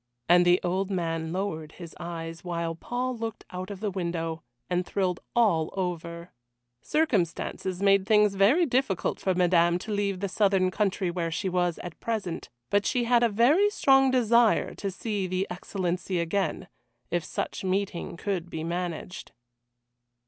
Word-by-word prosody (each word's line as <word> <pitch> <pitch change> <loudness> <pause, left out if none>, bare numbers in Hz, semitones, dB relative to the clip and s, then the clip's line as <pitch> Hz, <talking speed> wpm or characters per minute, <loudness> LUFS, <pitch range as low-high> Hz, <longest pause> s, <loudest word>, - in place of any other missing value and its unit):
And 175 +1 +6
the 175 +1 +5
old 185 +2 0
man 165 -4 -2
lowered 160 -5 -3
his 170 -3 -10
eyes, 165 -1 -6
while 170 -2 -2
Paul 245 +9 -3
looked 225 -1 -5
out 185 +1 -5
of 200 -1 -7
the 210 -2 -1
window, 170 -3 -3 0.3
and 180 0 0
thrilled 180 -1 -1 0.2
all 190 -10 +3
over. 170 -2 -4 0.5
Circumstances 190 - -1
made 195 -1 +4
things 210 -2 +5
very 220 - +4
difficult 250 - 0
for 190 -2 0
Madame 175 -1 +4
to 215 +4 -7
leave 200 -2 -1
the 200 - -1
southern 195 -1 +2
country 195 -3 0
where 170 -1 -2
she 165 +4 -2
was 175 -2 0
at 175 -2 -8
present, 210 -7 -3 0.2
but 205 0 +3
she 245 - +1
had 235 0 +3
a 235 - +4
very 275 - +4
strong 270 -8 +4
desire 235 -3 +3
to 200 - -4
see 200 0 -3
the 185 +1 -1
Excellency 180 0 -2
again 185 +2 -1 0.4
if 175 -1 0
such - - -4
meeting 190 -2 -2
could 180 -2 -3
be 160 -1 -5
managed. 175 +1 -4
185 Hz, 155 wpm, -27 LUFS, 175-210 Hz, 0.5 s, And